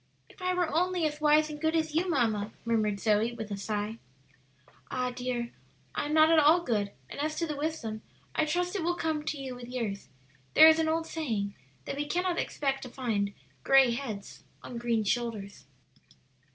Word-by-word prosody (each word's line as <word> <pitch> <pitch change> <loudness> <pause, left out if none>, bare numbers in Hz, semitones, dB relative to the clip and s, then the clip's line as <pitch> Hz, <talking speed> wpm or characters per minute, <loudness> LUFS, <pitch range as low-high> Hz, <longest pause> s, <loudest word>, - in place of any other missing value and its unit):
"If - - -17
I 365 0 0
were 350 -4 0
only 360 0 +2
as 300 0 -2
wise 305 0 +5
and 300 0 -8
good 320 +1 +1
as 315 -1 0
you, 350 +4 +1
mamma!" 220 -7 +1
murmured 215 -3 +1
Zoe 220 +2 +2
with 220 -3 -6
a - - -1
sigh. 210 +2 -3 0.9
"Ah, 250 0 -1
dear, 245 -1 -3 0.4
I - - -2
am 300 - -2
not 315 +1 +6
at 325 - +6
all 310 +4 +6
good; 210 -7 0 0.2
and - - -9
as 305 +1 -1
to 335 - -1
the 305 -2 -3
wisdom, 280 -8 -3 0.3
I 315 - +2
trust 355 +4 -1
it 390 - -1
will 345 +2 0
come 315 -3 -1
to 305 0 -3
you 270 -2 -5
with 245 -1 -9
years; 230 -6 -4 0.5
there 315 - +10
is 320 0 +6
an 320 0 +2
old 325 +1 0
saying 225 -13 -2 0.3
that - - -4
we 295 0 -2
cannot 360 +1 0
expect 270 -2 -1
to 255 - -7
find 215 -6 -2 0.3
gray 270 -2 +6
heads 230 -6 -5 0.2
on 240 - -6
green 235 -2 +1
shoulders." 210 -2 -2
270 Hz, 195 wpm, -29 LUFS, 225-315 Hz, 0.9 s, there